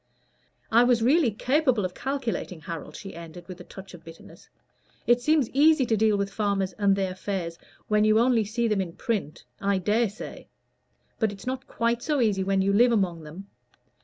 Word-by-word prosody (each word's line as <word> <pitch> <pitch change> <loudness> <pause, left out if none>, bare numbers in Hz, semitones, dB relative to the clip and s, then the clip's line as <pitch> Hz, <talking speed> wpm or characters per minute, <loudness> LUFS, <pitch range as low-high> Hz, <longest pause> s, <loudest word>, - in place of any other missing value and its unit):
"I 235 +2 +6
was 245 -2 +3
really 280 +2 +4
capable 255 0 +1
of 180 - -4
calculating, 240 - -4
Harold," 165 -1 -7
she 195 - -8
ended, 170 +1 -10
with 185 -1 -9
a - - -9
touch 190 +2 -12
of 170 -2 -12
bitterness. 165 0 -14 0.6
"It 240 0 +3
seems 305 -2 +2
easy 295 0 +4
to 225 - +1
deal 215 -1 +2
with 200 0 -2
farmers 200 -3 -1
and 200 -1 +3
their 190 -1 -1
affairs 185 -3 -4 0.3
when 210 0 +3
you 215 0 +4
only 235 -1 +3
see 230 +3 -1
them 210 -3 +1
in 170 -3 -5
print, 200 -10 -3 0.2
I 200 0 +1
dare 210 +4 +1
say; 205 - -10 0.7
but 220 -3 +1
it's 195 -1 -11
not 260 +1 -4
quite 235 0 -1
so 295 0 0
easy 205 -5 +2
when 195 0 +1
you 200 +1 +1
live 240 +4 +5
among 185 -7 0
them. 160 +6 -10
210 Hz, 190 wpm, -26 LUFS, 190-240 Hz, 0.7 s, I